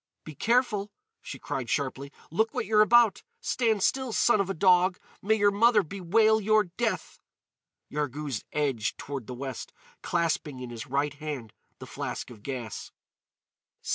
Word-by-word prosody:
"Be 155 - -9
careful!" 220 - +1 0.3
she - - -7
cried 125 -4 -4
sharply; 140 0 -2 0.2
"look 220 +7 0
what - - -1
you're 215 +1 +4
about! 230 -1 +5 0.2
Stand 225 -5 0
still, 265 -2 +1
son 220 -1 +3
of 195 - -3
a - - 0
dog! 180 +1 +4 0.2
May 220 +3 +2
your 205 -1 +4
mother 215 +1 +4
bewail 210 +5 +2
your 215 +1 +4
death!" 235 -2 -2 0.7
Yarghouz 145 -3 -3
edged 135 -8 -1
toward 140 -5 -6
the 125 - -6
west, 130 -1 -6 0.3
clasping 165 -5 -1
in 125 -1 -7
his 115 -2 -7
right 140 +3 0
hand 145 -7 -6 0.2
the - - -9
flask - - -5
of 110 -4 -13
gas. 120 -3 -6
170 Hz, 150 wpm, -28 LUFS, 140-215 Hz, 0.7 s, about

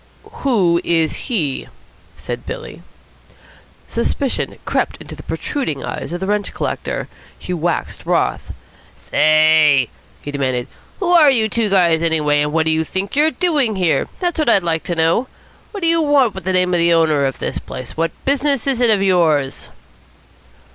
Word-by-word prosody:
"Who 185 -11 +2
is 165 -2 +1
he?" 155 - -2 0.5
said - - -6
Billy. 485 0 -7 1.1
Suspicion 275 -4 -2
crept - - -1
into - - -10
the - - -10
protruding 255 - -3
eyes - - -5
of 175 - -3
the 190 - -3
rent 205 0 -1
collector. - - -3 0.3
He 180 - -5
waxed 170 0 -3
wroth. - - 0 0.5
"Say!" 155 -4 +4 0.3
he 145 - -5
demanded. 130 -3 -2 0.3
"Who 360 - 0
are 325 -4 +7
you 230 -5 +2
two 220 0 0
guys, 170 -4 +3
anyway, 150 -3 +1
and 150 0 -1
what 160 0 +1
do 160 - +2
you 160 0 +1
think 190 - -4
you're 300 +2 +4
doing 300 - 0
here? 180 -4 +1
That's 350 -3 -1
what 305 - +2
I'd 195 -5 +4
like 165 -1 -1
to 175 - -2
know. 165 +10 +1 0.4
What 405 - -7
do - - +2
you 330 0 +3
want 285 -7 +3
with 190 -3 -8
the 190 - 0
name 180 0 +2
of 175 - +2
the 170 0 +4
owner 155 -4 +3
of 135 - -5
this - - -3
place? 130 - -8
What 165 +1 0 0.2
business 280 -2 +1
is 265 -3 0
it 240 - +4
of 205 -3 +3
yours?" 160 -8 +1
180 Hz, 175 wpm, -18 LUFS, 160-255 Hz, 1.1 s, are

